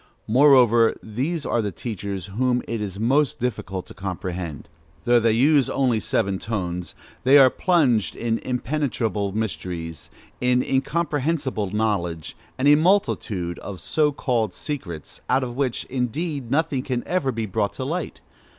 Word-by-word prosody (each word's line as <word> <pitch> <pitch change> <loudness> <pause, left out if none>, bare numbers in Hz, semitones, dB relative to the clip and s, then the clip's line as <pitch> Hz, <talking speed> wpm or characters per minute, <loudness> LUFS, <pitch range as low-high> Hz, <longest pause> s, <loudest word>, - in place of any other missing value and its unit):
Moreover, 120 -2 +5
these 140 +9 -2
are 120 - +1
the 105 -2 -2
teachers 100 -2 -5
whom 125 +5 0
it 115 -2 -3
is 100 -2 -5
most 135 +6 +2
difficult 95 -6 -3
to - - -12
comprehend. 90 -5 -5 0.4
Though 120 0 +4
they 115 -1 +3
use 140 +3 +4
only 125 -5 +1
seven 100 -3 0
tones, 90 -6 -4 0.3
they 135 +3 +7
are 130 -2 +7
plunged 140 - +2
in 115 -1 -1
impenetrable 125 -6 -1
mysteries, 85 -5 -4 0.3
in 125 0 +2
incomprehensible 140 - -1
knowledge 95 -6 -1 0.2
and 130 - +1
a 145 - +8
multitude 150 - +1
of 95 -3 -7
so 150 -1 +1
called 115 -8 -1
secrets, 95 - -6
out 130 +1 +3
of 120 -1 -5
which, 130 -3 -1
indeed, 135 +2 -3
nothing 145 -1 +1
can 125 -2 -2
ever 175 -7 0
be 115 -2 -3
brought 100 0 -1
to 130 - -5
light. 165 +3 -4
120 Hz, 145 wpm, -23 LUFS, 100-140 Hz, 0.4 s, a